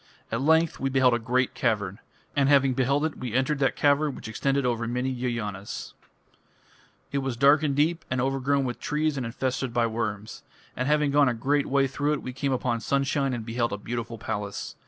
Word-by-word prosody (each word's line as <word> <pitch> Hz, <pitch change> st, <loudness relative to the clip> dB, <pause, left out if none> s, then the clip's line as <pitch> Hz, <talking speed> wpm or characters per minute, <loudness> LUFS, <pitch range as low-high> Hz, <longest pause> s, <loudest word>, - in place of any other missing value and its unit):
At 115 Hz, +2 st, -1 dB
length 160 Hz, +3 st, +3 dB
we 135 Hz, -, 0 dB
beheld 130 Hz, -2 st, +4 dB
a 120 Hz, -, +1 dB
great 125 Hz, +2 st, 0 dB
cavern. 105 Hz, -5 st, -1 dB, 0.4 s
And 140 Hz, -1 st, +3 dB
having 135 Hz, -2 st, +4 dB
beheld 140 Hz, +4 st, +1 dB
it, 160 Hz, -, -4 dB
we 125 Hz, -2 st, -4 dB
entered 135 Hz, +3 st, +1 dB
that 135 Hz, -, +2 dB
cavern 145 Hz, 0 st, +2 dB
which -, -, -8 dB
extended 135 Hz, +5 st, 0 dB
over 115 Hz, -2 st, 0 dB
many 125 Hz, +2 st, -1 dB
yojanas. 115 Hz, -6 st, -4 dB, 1.2 s
It 140 Hz, -, 0 dB
was 135 Hz, -3 st, -3 dB
dark 140 Hz, +4 st, +5 dB
and 145 Hz, -3 st, 0 dB
deep, 160 Hz, +4 st, +1 dB
and 130 Hz, -, -1 dB
overgrown 135 Hz, +1 st, +1 dB
with 120 Hz, -1 st, -4 dB
trees 150 Hz, 0 st, 0 dB
and 130 Hz, -4 st, -3 dB
infested 130 Hz, 0 st, -2 dB
by 120 Hz, -1 st, +3 dB
worms. 110 Hz, -2 st, -4 dB, 0.3 s
And 130 Hz, -, -2 dB
having 150 Hz, -1 st, +2 dB
gone 145 Hz, -2 st, +5 dB
a 120 Hz, -, -1 dB
great 140 Hz, +5 st, +1 dB
way 135 Hz, 0 st, +3 dB
through 145 Hz, +2 st, -1 dB
it, 150 Hz, -, -3 dB
we 130 Hz, -, -5 dB
came 135 Hz, +1 st, -1 dB
upon 125 Hz, -2 st, 0 dB
sunshine 140 Hz, +3 st, 0 dB
and 120 Hz, -3 st, -4 dB
beheld 115 Hz, -1 st, -1 dB
a -, -, -2 dB
beautiful 115 Hz, +2 st, -5 dB
palace. 105 Hz, -2 st, -4 dB
130 Hz, 200 wpm, -26 LUFS, 120-140 Hz, 1.2 s, dark